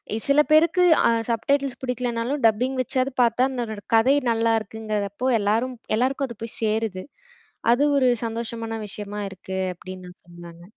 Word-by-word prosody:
எ - - -1
சில 280 +1 +4
பேருக்கு 335 +4 +5 0.2
அ - - +4 0.2
subtitles 270 +4 0
பிடிக்கலனாலும் 250 +2 -2
dubbing 250 +5 0
வச்சாவது 255 +2 -1
பாத்தா 235 +1 +3
அதனோட 235 -5 -4 0.2
கதை 255 +5 +5 0.2
நல்லா 225 0 +2
இருக்குங்கிறதப்போ 215 +1 -4
எல்லாரும் 225 +5 0 0.2
எல்லாருக்கும் 265 +3 0
அது 235 - -9
போய் 230 - -8
சேருது. 215 -3 -1 0.7
அது 270 +4 +2
ஒரு 255 -2 +4 0.2
சந்தோஷமான 230 0 -4
விஷயமா 205 +1 -6
இருக்கு. 190 0 -7 0.2
அப்பிடின்னு 185 +1 -10
நான் 180 - -16
சொல்லுவேங்க. 170 0 -13
230 Hz, 145 wpm, -23 LUFS, 210-255 Hz, 0.7 s, பேருக்கு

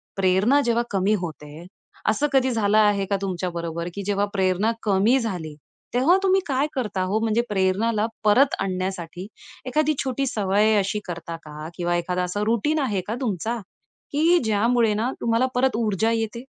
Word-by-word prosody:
प्रेरणा 195 +9 +3
जेव्हा 235 0 +2
कमी 195 +1 +1
होते, 155 -1 -8 0.4
असं 295 - +1
कधी 260 -1 +3
झालं 215 -2 +2
आहे 205 -2 +3
का 200 +1 0
तुमच्याबरोबर, 170 -3 -3
की 200 - -5
जेव्हा 200 0 +1
प्रेरणा 190 +2 +1
कमी 210 +5 +3
झाली? 180 - -4 0.4
तेव्हा 265 +9 +4
तुम्ही 385 0 +4
काय 275 +1 +1
करता 210 -8 -2
हो? 195 +4 0
म्हणजे 225 +1 +1
प्रेरणाला 210 +3 +1 0.2
परत 250 +7 +4
आणण्यासाठी, 185 -1 -4 0.4
एखादी 305 +4 +1
छोटी 270 +1 -1
सवय 210 0 +2
अशी 200 +1 0
करता 170 -2 -6
का? 150 0 -8
किंवा 175 0 -1
एखादं 180 +1 -1
असं 205 +4 -2
रुटीन 235 +8 +1
आहे 215 -9 0
का 220 - -2
तुमचा? 225 0 -2 0.5
की 325 +4 +4
ज्यामुळे 225 +1 +2
ना 225 +5 -1
तुम्हाला 230 +2 +2
परत 255 0 +2
ऊर्जा 220 0 +1
येते. 225 +1 -2
210 Hz, 160 wpm, -23 LUFS, 185-235 Hz, 0.5 s, तेव्हा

